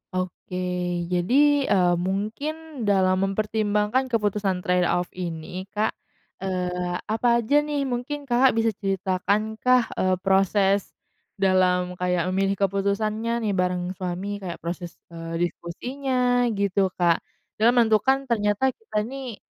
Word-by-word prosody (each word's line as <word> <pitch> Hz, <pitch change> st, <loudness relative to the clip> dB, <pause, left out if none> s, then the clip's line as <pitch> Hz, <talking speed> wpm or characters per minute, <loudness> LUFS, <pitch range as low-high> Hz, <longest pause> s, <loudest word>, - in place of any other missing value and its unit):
Oke. 185 Hz, 0 st, -4 dB, 0.6 s
Jadi, 180 Hz, +7 st, 0 dB, 0.4 s
eee, 180 Hz, -3 st, +4 dB, 0.2 s
mungkin 275 Hz, +8 st, -4 dB
dalam 190 Hz, -2 st, +3 dB
mempertimbangkan 210 Hz, +4 st, 0 dB
keputusan 205 Hz, -5 st, 0 dB
trade 180 Hz, 0 st, +2 dB
off 175 Hz, 0 st, 0 dB
ini, 180 Hz, +1 st, -6 dB
Kak, 215 Hz, +1 st, +1 dB, 0.5 s
eee, 180 Hz, -1 st, -2 dB, 0.2 s
apa 225 Hz, +2 st, +1 dB, 0.2 s
aja, 285 Hz, +7 st, +1 dB
nih, 295 Hz, -1 st, -1 dB
mungkin 265 Hz, +3 st, -3 dB
Kakak 260 Hz, 0 st, +4 dB
bisa 225 Hz, 0 st, +2 dB
ceritakankah, 205 Hz, +5 st, +1 dB, 0.2 s
eee, 185 Hz, 0 st, +2 dB
proses 195 Hz, 0 st, +2 dB, 0.4 s
dalam 180 Hz, -2 st, +2 dB
kayak 180 Hz, -1 st, +1 dB
memilih 195 Hz, +1 st, +1 dB
keputusannya, 215 Hz, +4 st, 0 dB
nih, 210 Hz, -, 0 dB
bareng 180 Hz, 0 st, 0 dB
suami, 185 Hz, +3 st, -3 dB
kayak 180 Hz, -3 st, -7 dB
proses, 175 Hz, 0 st, -5 dB, 0.2 s
eee, 165 Hz, 0 st, -3 dB
diskusinya, 245 Hz, +7 st, -1 dB
gitu, 200 Hz, -1 st, +1 dB
Kak? 170 Hz, -2 st, +3 dB, 0.4 s
Dalam 235 Hz, +3 st, +4 dB
menentukan 240 Hz, +4 st, +3 dB
ternyata 210 Hz, +4 st, +2 dB
kita 215 Hz, -3 st, -3 dB
ini, 255 Hz, -1 st, -6 dB
200 Hz, 120 wpm, -24 LUFS, 180-235 Hz, 0.6 s, eee